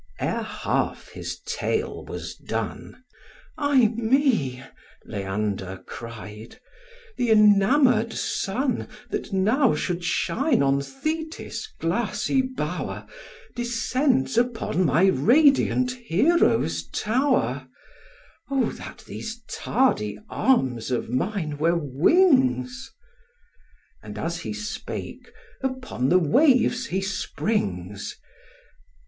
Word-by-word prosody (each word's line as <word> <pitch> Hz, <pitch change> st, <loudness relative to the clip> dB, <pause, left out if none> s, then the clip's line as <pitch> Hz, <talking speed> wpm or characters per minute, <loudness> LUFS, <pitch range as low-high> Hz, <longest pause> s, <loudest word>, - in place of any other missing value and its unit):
Ere -, -, -1 dB
half -, -, -2 dB
this -, -, -6 dB
tale 445 Hz, +1 st, -2 dB
was -, -, -6 dB
done, 255 Hz, -, -5 dB, 0.5 s
"Ay 285 Hz, -6 st, +4 dB
me," 225 Hz, -, +1 dB, 0.4 s
Leander 95 Hz, -2 st, -3 dB
cried, 110 Hz, -1 st, -9 dB, 0.6 s
"th' 245 Hz, -, +1 dB
enamour'd 220 Hz, +3 st, +5 dB
sun, 245 Hz, +6 st, -1 dB, 0.2 s
That -, -, -3 dB
now 220 Hz, +8 st, +3 dB
should 175 Hz, -1 st, -2 dB
shine 260 Hz, -, +1 dB
on 140 Hz, 0 st, +2 dB
Thetis' 315 Hz, -, -5 dB
glassy 210 Hz, +8 st, 0 dB
bower, 260 Hz, 0 st, -4 dB, 0.5 s
Descends 245 Hz, +2 st, +1 dB
upon 230 Hz, -6 st, 0 dB
my 155 Hz, +7 st, +4 dB
radiant 255 Hz, -, +4 dB
Hero's 235 Hz, -, +2 dB
tower: 215 Hz, -, 0 dB, 0.8 s
O, 270 Hz, -2 st, +1 dB
that -, -, -10 dB
these 230 Hz, +1 st, -7 dB
tardy 230 Hz, -, 0 dB
arms 130 Hz, -, +1 dB
of 125 Hz, -2 st, -2 dB
mine 155 Hz, -, -2 dB
were 170 Hz, +3 st, +3 dB
wings!" 160 Hz, -, +2 dB, 1.1 s
And, 105 Hz, 0 st, -9 dB
as 170 Hz, +5 st, -3 dB
he 165 Hz, -, -5 dB
spake, 215 Hz, +2 st, -6 dB, 0.3 s
upon 260 Hz, -, -2 dB
the 180 Hz, -, +6 dB
waves 250 Hz, -, +3 dB
he 190 Hz, +2 st, -1 dB
springs. 105 Hz, -, -2 dB
215 Hz, 95 wpm, -25 LUFS, -, 1.1 s, the